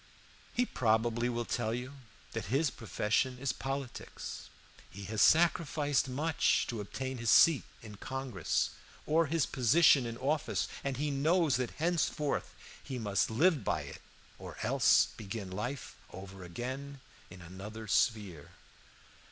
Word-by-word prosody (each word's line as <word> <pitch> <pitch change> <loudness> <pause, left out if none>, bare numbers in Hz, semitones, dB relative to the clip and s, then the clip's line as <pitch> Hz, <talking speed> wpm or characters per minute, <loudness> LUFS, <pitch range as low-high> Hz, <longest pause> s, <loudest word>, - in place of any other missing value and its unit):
He 245 - +1
probably 120 - +1
will 120 -1 -2
tell 115 -1 -1
you 130 +3 -7 0.3
that 115 - -4
his 135 +6 +1
profession 120 +3 -1
is 130 0 -1
politics. 135 -2 -6 0.4
He 100 - -9
has 105 +2 -2
sacrificed 155 -4 +3
much 150 +5 +1
to 115 -3 -3
obtain 130 +5 -5
his 115 -1 -1
seat 160 +2 +7 0.2
in 105 -2 -10
Congress, 130 - -2 0.3
or 160 +1 +3
his 160 0 +1
position 135 +1 +4
in 115 0 -6
office, 145 +4 -1 0.2
and 135 -2 -2
he 145 +1 -1
knows 155 0 +2
that 125 -2 -1
henceforth 160 -3 -1 0.3
he 130 -2 -5
must 105 -4 0
live 150 +6 +3
by 75 - 0
it 70 - -10 0.4
or - - -9
else - - +4
begin 100 -2 -6
life 125 +8 -5 0.2
over 95 0 -9
again 130 +10 -6 0.3
in 90 -2 -12
another 100 +5 -8
sphere. 95 -6 0
125 Hz, 135 wpm, -32 LUFS, 110-140 Hz, 0.4 s, seat